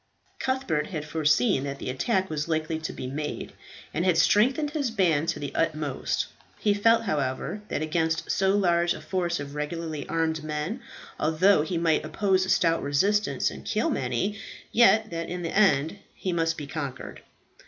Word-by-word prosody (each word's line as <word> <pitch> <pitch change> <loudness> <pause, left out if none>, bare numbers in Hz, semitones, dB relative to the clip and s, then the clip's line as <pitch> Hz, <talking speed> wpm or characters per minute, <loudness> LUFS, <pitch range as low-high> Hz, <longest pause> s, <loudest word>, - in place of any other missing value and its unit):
Cuthbert 260 - -1
had 155 -5 -5
foreseen 155 - +2
that 140 0 -4
the 130 - -4
attack 190 - 0
was 150 -2 -3
likely 160 0 -1
to 160 - -4
be - - -7
made 150 +3 -4 0.4
and 170 - 0
had 180 -3 +3
strengthened 260 - +3
his 290 -5 -1
band 165 -8 +2
to - - -1
the 145 -2 -5
utmost. 155 -4 -1 0.3
He 205 - +2
felt, 225 +3 +4
however, 145 +1 -2
that - - -2
against 160 +1 0
so 195 +1 +2
large 175 -3 +2
a - - -8
force 175 -2 -1
of 145 0 -6
regularly 150 0 -4
armed 160 -1 0
men, 155 +10 -3 0.4
although 160 +4 +4
he 165 +3 -2
might 165 -2 +2
oppose 190 -2 +1
a - - -5
stout 165 -2 +3
resistance 200 +10 +1
and - - -9
kill - - 0
many, 205 +1 -1 0.3
yet 220 -2 +5
that 165 0 -4
in 180 0 -4
the 165 - -3
end 195 -3 +3 0.2
he 185 - -3
must 165 -1 0
be 145 - -5
conquered. 140 -3 -6
165 Hz, 175 wpm, -26 LUFS, 150-195 Hz, 0.4 s, yet